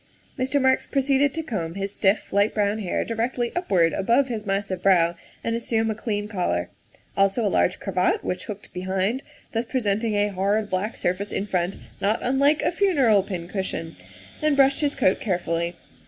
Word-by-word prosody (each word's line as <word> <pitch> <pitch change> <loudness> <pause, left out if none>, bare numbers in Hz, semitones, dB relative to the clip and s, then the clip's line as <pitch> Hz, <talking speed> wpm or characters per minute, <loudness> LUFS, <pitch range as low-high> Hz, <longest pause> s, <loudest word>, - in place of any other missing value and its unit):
Mr. 265 +1 0
Marks 260 -1 +2
proceeded 275 0 +2
to 320 +3 -4
comb 180 - -4
his 200 0 -4
stiff, 195 0 +1
light 200 +2 +2
brown 205 0 +1
hair 190 -5 -1
directly 235 +1 -1
upward 185 - +2
above 235 +7 +2
his 220 -3 -4
massive 195 -2 -1
brow 175 -3 +4 0.3
and 230 - 0
assume 225 -1 0
a - - -1
clean 210 -1 -3
collar; 175 - -1 0.4
also 195 +4 +2
a - - +3
large 180 - +2
cravat 185 -2 0
which 180 0 -3
hooked 210 -1 -8
behind, 190 +7 -1 0.3
thus 225 0 0
presenting 220 -3 0
a 205 0 +2
hard, 200 +2 0
black 195 +4 -2
surface 185 +3 -1
in 200 - -1
front, 180 -1 -1 0.3
not 210 +3 +2
unlike 280 +4 +3
a - - +2
funereal 285 - +3
pincushion, 180 -3 -4 0.5
and 305 -1 +2
brushed 275 +1 +4
his 290 -1 0
coat 210 -9 +2
carefully. 170 -3 -1
205 Hz, 170 wpm, -24 LUFS, 190-245 Hz, 0.5 s, brow